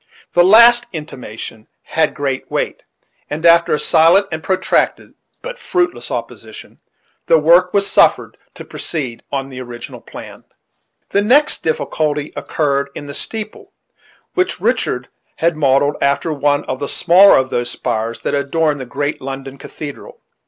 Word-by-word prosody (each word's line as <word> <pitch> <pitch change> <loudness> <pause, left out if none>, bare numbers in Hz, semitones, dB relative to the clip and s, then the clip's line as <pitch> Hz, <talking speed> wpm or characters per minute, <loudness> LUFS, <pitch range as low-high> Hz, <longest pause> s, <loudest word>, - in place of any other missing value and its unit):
This 175 - +5
last 235 +5 +6
intimation 120 -8 -8 0.2
had 160 -1 0
great 140 -3 -3
weight, - - -3 0.4
and 155 +3 -4
after 170 0 +5
a - - +3
silent 170 +6 +4
and 160 -1 -4
protracted, 190 +2 0 0.3
but - - -7
fruitless 360 -5 -2
opposition, - - -8 0.5
the 165 - +5
work 170 +4 +4
was 200 -1 +2
suffered 200 - +2 0.2
to - - -10
proceed 130 -8 -5
on 135 -1 -3
the 130 -1 -8
original 120 -1 -9
plan. - - -11 0.7
The 200 - +2
next 265 +8 +3
difficulty 150 -2 -2
occurred 140 -2 -1
in 145 - -7
the 140 - -8
steeple, 215 +7 -5 0.6
which 370 0 -1
Richard - - -1 0.3
had 170 0 0
modelled 145 0 +2
after 140 +3 0
one 145 0 0
of 130 - -4
the 140 - -4
smaller 185 +3 +6
of 130 0 0
those 120 0 -1
spires 115 -1 -3
that - - -3
adorn 145 +1 0
the 130 - -7
great 145 +3 -3
London 135 0 -7
cathedral. 145 0 -9
150 Hz, 145 wpm, -17 LUFS, 135-175 Hz, 0.7 s, last